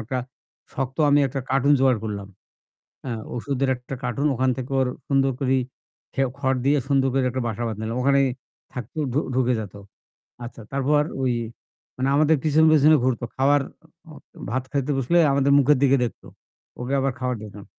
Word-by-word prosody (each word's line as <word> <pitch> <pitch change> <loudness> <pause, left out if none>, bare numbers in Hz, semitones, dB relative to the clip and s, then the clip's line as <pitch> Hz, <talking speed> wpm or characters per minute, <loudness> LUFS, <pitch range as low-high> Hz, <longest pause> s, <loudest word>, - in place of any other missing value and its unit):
একটা 125 +4 -3 0.6
শক্ত 135 0 -3
আমি 145 +1 +5
একটা 135 +1 -4
কার্টুন 135 +2 +3
জোগাড় 130 -3 +3
করলাম। 100 -2 -5 0.8
এ্যা 125 - -3 0.2
ওষুধের 135 +2 -1
একটা 125 +2 -8
কার্টুন। 125 +4 -1
ওখান 130 +1 +1
থেকে 130 0 -6
ওর 130 - +1 0.2
সুন্দর 135 -1 +2
করে 135 -1 +2 0.6
খেও 135 -1 +1
খড় 130 -2 0
দিয়ে 145 +2 +3
সুন্দর 135 -2 +2
করে 135 - +2
একটা 130 +1 -3
বাসা 115 +1 -4
বাঁধলাম 110 +1 -4
ওখানেই 140 +1 +3 0.5
থাকতো, 125 +4 -7
ঢু 140 - +1
ঢুকে 125 -1 +2
যেত। 105 -3 -8 0.7
আচ্ছা 120 0 -9
তারপর 145 +2 +2 0.2
ওই 130 -1 +1 0.6
মানে 130 +1 -1
আমাদের 155 +1 +4
পিছনে, 155 +1 +4
পিছনে, 155 +1 +6
ঘুরতো। 125 -2 0
খাবার 140 +2 +3
অ - - -25 0.4
অ- - - -13
ভাত 130 +2 -1
খাইতে 140 0 -1
বসলে 135 +7 +2
আমাদের 140 0 +2
মুখের 145 0 +4
দিকে 140 0 +5
দেখতো। 120 - -7 0.5
ওকে 125 +3 -2
আবার 135 0 0
খাবার 125 -1 -1
দিতাম। 105 -1 -10
135 Hz, 170 wpm, -23 LUFS, 125-140 Hz, 0.8 s, পিছনে